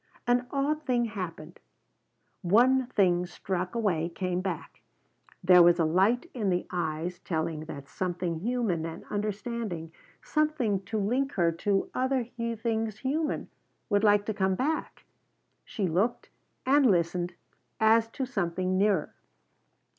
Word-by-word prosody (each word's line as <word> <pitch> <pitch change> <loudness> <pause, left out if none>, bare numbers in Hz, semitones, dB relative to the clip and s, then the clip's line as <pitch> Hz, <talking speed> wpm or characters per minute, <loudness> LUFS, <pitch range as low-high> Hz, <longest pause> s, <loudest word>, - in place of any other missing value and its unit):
An 245 0 +2
odd 290 +3 0
thing 245 -4 +1
happened; 175 -6 -6 0.8
one 245 +7 +4
thing 180 -6 +2
struck 180 +2 -4
away 180 -8 0
came 180 +1 -2
back. 185 -4 -5 0.6
There 180 0 +8
was 175 0 +6
a 165 - +2
light 195 - +2
in 215 -6 -1
the 180 -1 0
eyes 175 0 -2
telling 160 -3 -3
that 140 -3 -8
something 175 -2 -3
human 220 -5 -1
and 165 0 -6
understanding, 210 -4 -3 0.3
something 300 -11 0
to 220 - -3
link 250 +7 0
her 170 -3 +2
to 195 +4 -1
other 260 -1 0
things 225 -2 -2
human, 295 +4 -2 0.4
would 205 +1 +3
like 205 -1 +4
to 220 - -1
come 190 -2 +1
back. 305 +8 -2 0.6
She 205 - -3
looked 195 +9 0 0.4
and 275 -1 +5
listened 175 -1 +1 0.4
as 225 +1 +5
to 265 +4 -4
something 185 -5 -1
nearer. 200 -5 +2
200 Hz, 130 wpm, -28 LUFS, 175-240 Hz, 0.8 s, There